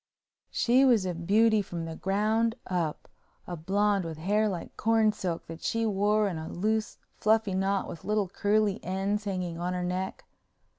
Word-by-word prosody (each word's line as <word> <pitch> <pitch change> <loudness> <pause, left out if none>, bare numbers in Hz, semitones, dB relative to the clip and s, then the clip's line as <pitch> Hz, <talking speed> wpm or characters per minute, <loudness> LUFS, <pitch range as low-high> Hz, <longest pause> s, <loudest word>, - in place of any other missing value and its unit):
She 250 +3 +3
was 235 -7 +4
a 180 - -1
beauty 210 +6 +3
from 175 -4 -5
the 165 0 -6
ground 215 +5 +1
up—a 175 0 -5
blonde 200 +4 +1
with 165 -2 -6
hair 210 +6 +1
like 180 -4 -6
corn 225 -1 +3
silk 180 -5 -4
that 165 0 -9
she 230 0 0
wore 210 0 +2
in 175 -5 -3
a 160 - -6
loose, 215 +4 -1 0.2
fluffy 220 -2 +2
knot 195 +1 0
with 165 - -8
little 210 -1 0
curly 205 +2 +1
ends 195 +3 -1
hanging 180 -4 -3
on 180 +1 -2
her 180 0 -2
neck. 185 +1 -3
195 Hz, 165 wpm, -28 LUFS, 180-215 Hz, 0.2 s, was